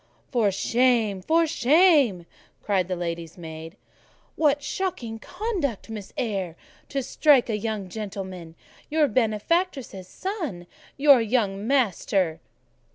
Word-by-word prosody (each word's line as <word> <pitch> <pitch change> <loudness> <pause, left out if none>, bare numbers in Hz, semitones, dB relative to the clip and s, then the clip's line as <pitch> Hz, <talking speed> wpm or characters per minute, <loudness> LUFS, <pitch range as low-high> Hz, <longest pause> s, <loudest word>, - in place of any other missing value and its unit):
"For 230 -5 +3
shame! 225 -1 +1
for 330 - +3
shame!" 290 - +4 0.4
cried 190 -4 +1
the 185 - -2
lady's 170 -1 -5
maid. 160 +2 -9 0.6
"What 290 -2 +2
shocking 255 -11 -3
conduct, 300 - -3
Miss 210 -3 -7
Eyre, 195 -9 -2 0.3
to 275 -1 -2
strike 270 -3 +3
a - - 0
young 215 -3 -3
gentleman, 190 -4 -7 0.3
your 305 -1 +3
benefactress's 250 - -1
son! 320 - -5 0.3
Your 280 -3 +6
young 210 -3 0
master." 195 - +1
225 Hz, 110 wpm, -25 LUFS, 190-280 Hz, 0.6 s, Your